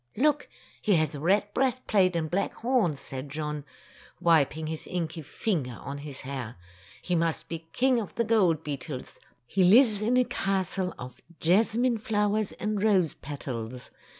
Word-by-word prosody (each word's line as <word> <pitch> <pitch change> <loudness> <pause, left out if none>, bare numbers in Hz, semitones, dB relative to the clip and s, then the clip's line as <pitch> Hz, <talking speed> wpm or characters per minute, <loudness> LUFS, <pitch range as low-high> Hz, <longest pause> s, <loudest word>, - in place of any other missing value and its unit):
"Look! 295 +3 +2 0.3
He 205 - +3
has 155 -2 +1
a 145 - -6
red 200 +6 +2
breast 255 -1 0
plate 185 -4 +3
and 160 -2 0
black 185 +5 -1
horns," 225 - +1
said 135 +1 -6
John, 150 0 -4 0.6
wiping 160 -3 +3
his 160 0 -5
inky 165 -2 -3
finger 150 - -2
on 140 +1 -6
his 145 -2 -7
hair. 130 -4 -5 0.5
"He 180 - -1
must 165 -1 0
be 165 -1 -6
King 255 -1 +3
of 210 - -6
the 235 - +2
gold 190 -9 +3
beetles. 140 -2 -6 0.3
He 185 +10 +1
lives 215 +2 +6
in 235 +4 +2
a 250 - +5
castle 190 -4 -1
of 125 0 -9 0.2
jasmine 225 +7 +3
flowers 210 -1 0
and 210 -1 -2
rose 195 -7 +3
petals. 125 -4 -6
175 Hz, 160 wpm, -28 LUFS, 150-215 Hz, 0.6 s, lives